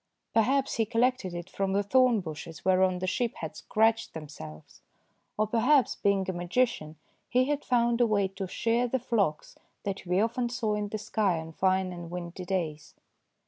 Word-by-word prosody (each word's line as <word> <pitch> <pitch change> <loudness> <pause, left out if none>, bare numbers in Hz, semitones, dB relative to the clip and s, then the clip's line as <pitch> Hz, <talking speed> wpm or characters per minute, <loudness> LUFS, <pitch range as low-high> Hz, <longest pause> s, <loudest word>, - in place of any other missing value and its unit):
Perhaps 265 +5 +2
he 225 - +2
collected 230 -5 +1
it 175 0 -6
from 195 -1 -2
the 200 +1 +2
thorn 250 0 +4
bushes 160 -1 -8
whereon 185 -1 +3
the 185 - -3
sheep 235 +5 -1
had 160 - -6
scratched 225 -1 +1
themselves, 80 - -10 0.6
or 215 - +2
perhaps, 245 +5 +3
being 195 -2 +1
a 190 - -1
magician, 175 -2 -1 0.3
he 255 +1 +3
had 290 +1 -1
found 235 -1 +2
a 240 - +5
way 200 -3 +2
to 190 0 -6
shear 230 +6 +1
the 260 - 0
flocks 210 -11 -1 0.2
that 195 -1 -4
we 180 +2 +2
often 235 +3 0
saw 230 -3 -1
in 210 0 -1
the 215 - -3
sky 205 -4 0
on 160 0 -6
fine 185 +1 +1
and 175 -1 -8
windy 180 +1 -6
days. 165 -5 -3
200 Hz, 180 wpm, -28 LUFS, 180-235 Hz, 0.6 s, a